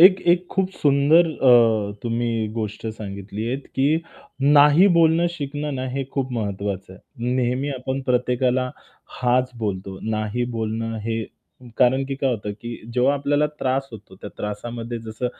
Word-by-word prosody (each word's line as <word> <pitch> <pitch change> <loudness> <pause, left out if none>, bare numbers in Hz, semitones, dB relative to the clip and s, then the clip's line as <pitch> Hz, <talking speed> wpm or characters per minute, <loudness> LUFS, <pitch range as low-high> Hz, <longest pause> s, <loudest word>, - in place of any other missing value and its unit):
एक 185 +2 +8
एक 180 0 0
खूप 190 -1 0
सुंदर 145 +4 +5
अ, 115 -7 +4
तुम्ही 115 -1 -1
गोष्ट 110 -1 -4
सांगितली 105 0 -6
आहेत 135 +3 -4
की 140 +4 +3 0.5
नाही 145 +5 +6
बोलणं 165 0 +4
शिकणं 145 -2 -4
ना, 130 0 -3
हे 135 +2 -3
खूप 135 -2 -2
महत्त्वाचं 100 -4 -3
आहे. 120 +6 -5
नेहमी 130 +2 0
आपण 130 0 -3
प्रत्येकाला 125 0 +1 0.5
हांच 125 +1 +2
बोलतो. 95 -3 -4
नाही 110 +2 -1
बोलणं 115 0 -2
हे 115 0 -1 0.6
कारण 130 +2 +4
की 135 - -3
काय 135 -1 0
होतं 105 -3 -3
की 120 0 -6 0.2
जेव्हा 130 +3 +3
आपल्याला 145 +1 +1
त्रास 135 +1 -1
होतो 105 -3 -12
त्या 105 - -7
त्रासामध्ये 115 +3 -5
जसं 110 +2 -4
125 Hz, 150 wpm, -22 LUFS, 110-140 Hz, 0.6 s, एक